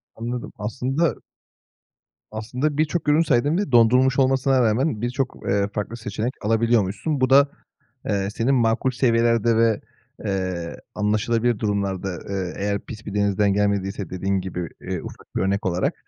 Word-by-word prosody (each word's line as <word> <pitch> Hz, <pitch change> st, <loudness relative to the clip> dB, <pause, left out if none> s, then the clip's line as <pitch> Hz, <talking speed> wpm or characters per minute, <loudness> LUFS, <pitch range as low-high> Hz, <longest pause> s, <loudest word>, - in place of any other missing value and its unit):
Anladım. 120 Hz, +2 st, -5 dB
Aslında 130 Hz, +9 st, -1 dB, 1.2 s
aslında 125 Hz, +7 st, -2 dB
birçok 155 Hz, +1 st, 0 dB
ürün 155 Hz, +3 st, +5 dB
saydın 145 Hz, +2 st, +2 dB
ve 200 Hz, -9 st, -2 dB
dondurulmuş 125 Hz, +3 st, +5 dB
olmasına 130 Hz, 0 st, +3 dB
rağmen 115 Hz, +1 st, +1 dB
birçok, 125 Hz, +2 st, -2 dB
eee, 100 Hz, 0 st, +2 dB
farklı 105 Hz, +3 st, -4 dB
seçenek 110 Hz, +3 st, -3 dB
alabiliyormuşsun. 115 Hz, +4 st, +1 dB
Bu 130 Hz, -, +3 dB
da, 135 Hz, +1 st, +8 dB, 0.7 s
eee, 100 Hz, -1 st, 0 dB
senin 130 Hz, +4 st, +2 dB
makul 120 Hz, +1 st, +2 dB
seviyelerde 115 Hz, -2 st, +2 dB
ve, 115 Hz, -2 st, +3 dB, 0.4 s
eee, 95 Hz, -4 st, -2 dB, 0.2 s
anlaşılabilir 110 Hz, +2 st, +1 dB
durumlarda, 100 Hz, -3 st, -1 dB, 0.2 s
eee, 95 Hz, -3 st, -3 dB
eğer 100 Hz, 0 st, -1 dB
pis 110 Hz, +2 st, -10 dB
bir 105 Hz, -, -6 dB
denizden 100 Hz, 0 st, +2 dB
gelmediyse 100 Hz, -1 st, -1 dB
dediğin 95 Hz, +1 st, -1 dB
gibi, 90 Hz, -2 st, -5 dB
eee, -, -, -4 dB
ufak -, -, -12 dB
bir -, -, +1 dB
örnek 100 Hz, +2 st, 0 dB
olarak, 90 Hz, -1 st, 0 dB
115 Hz, 140 wpm, -23 LUFS, 100-125 Hz, 1.2 s, da